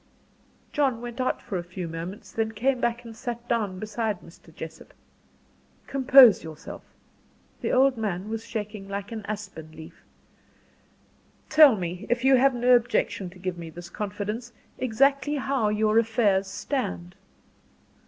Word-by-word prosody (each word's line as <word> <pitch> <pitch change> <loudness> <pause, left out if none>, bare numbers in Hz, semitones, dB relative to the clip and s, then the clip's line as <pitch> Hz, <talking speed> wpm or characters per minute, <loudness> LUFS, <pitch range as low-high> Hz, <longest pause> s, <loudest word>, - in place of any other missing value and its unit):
John 270 -5 +1
went 240 +1 -5
out 255 - -1
for 190 - -3
a - - -5
few 180 0 -6
moments, 170 +7 -7
then 225 0 -2
came 250 +4 0
back 235 0 -1
and 225 -1 -9
sat 235 0 -6
down 210 -6 -1
beside 215 -1 -3
Mr. 165 0 -16
Jessop. 160 0 -10 0.9
"Compose 260 -5 +7
yourself," 160 -1 -9 0.8
the - - -1
old 265 0 +4
man 200 -3 -3
was 225 0 -4
shaking 210 -3 -6
like 200 +2 -5
an 220 -2 -5
aspen 195 -7 -7
leaf. 160 0 -12 1.5
"Tell 305 -5 +8
me, 180 -1 -5
if 240 +2 0
you 270 0 +7
have 265 0 +4
no 245 +1 +5
objection 230 -5 0
to 180 - -15
give 180 -1 -4
me 165 -1 -7
this 170 +1 -10
confidence, 210 +3 -4 0.3
exactly 275 +4 +2
how 270 -5 0
your 215 +1 +3
affairs 215 -4 +2
stand." 140 - -3
220 Hz, 145 wpm, -26 LUFS, 185-245 Hz, 1.5 s, Tell